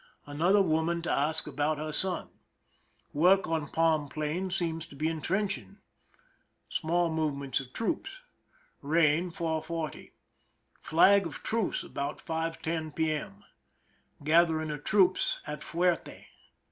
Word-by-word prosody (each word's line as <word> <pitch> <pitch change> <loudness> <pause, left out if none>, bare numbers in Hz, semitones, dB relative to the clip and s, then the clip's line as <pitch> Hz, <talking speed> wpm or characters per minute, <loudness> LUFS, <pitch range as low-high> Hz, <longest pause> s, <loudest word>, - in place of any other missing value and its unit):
Another 175 +8 +3
woman 165 0 0
to - - -1
ask 155 +3 +1
about 150 +1 -1
her 155 +1 -4
son. 185 +3 -1 0.8
Work 180 +6 +4
on 160 -2 -1
palm 160 -3 +2
plain 155 +6 -2
seems 165 -3 -2
to 145 - -14
be 155 +3 -1
intrench 175 +2 -1
ing. 95 -5 -18 0.9
Small 170 +1 0
movements 140 -4 -1
of 130 -2 -9
troops. 230 - -2 0.7
Rain, 160 +3 +2
4: 165 -2 -2
40. 165 -1 -5 0.7
Flag 190 +3 +5
of 155 - -8
truce 225 -3 0
about 140 +1 -4
5:10 160 -1 -3
p.m. 155 -11 -2 0.8
Gathering 160 0 +3
of 145 -1 -6
troops 190 -3 +3
at 150 0 -6
fuerte. 175 +2 -1
160 Hz, 120 wpm, -29 LUFS, 150-175 Hz, 0.9 s, Flag